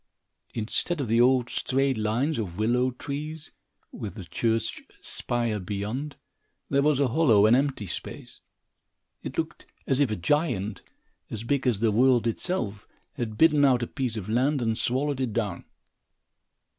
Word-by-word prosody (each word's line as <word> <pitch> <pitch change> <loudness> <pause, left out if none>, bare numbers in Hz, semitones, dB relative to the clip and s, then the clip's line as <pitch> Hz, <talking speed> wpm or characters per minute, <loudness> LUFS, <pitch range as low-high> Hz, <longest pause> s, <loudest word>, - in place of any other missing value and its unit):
Instead 120 +9 -1
of 135 - -1
the 115 +2 +3
old, 125 -1 +4
straight 135 +2 0
lines 115 +7 0
of 90 -5 -4
willow 120 +4 +2
trees, 150 +5 -6 0.4
with 100 -3 -6
the 100 - -7
church 115 +6 -1 0.2
spire 120 -3 -2
beyond, 105 +10 -4 0.6
there 140 0 +4
was 145 -1 +3
a 140 -3 +3
hollow 115 -7 +5
and 110 +2 +6
empty 135 -5 0
place. 85 - -7 0.8
It - - -7
looked - - -3 0.2
as 135 - +1
if 140 -4 +3
a 110 - -1
giant, 110 - 0 0.5
as 110 0 -5
big 135 +2 0
as 110 -5 +1
the 115 -2 +3
world 125 +1 +4
itself, 115 - -2 0.3
had 115 -6 -4
bitten 150 -3 +5
out 125 -3 +4
a - - 0
piece 125 -5 -3
of 100 -3 -5
land 130 +6 +2
and 115 -2 0
swallowed 135 +4 -1
it 125 -5 -1
down. 105 -6 -2
120 Hz, 155 wpm, -27 LUFS, 110-140 Hz, 0.8 s, and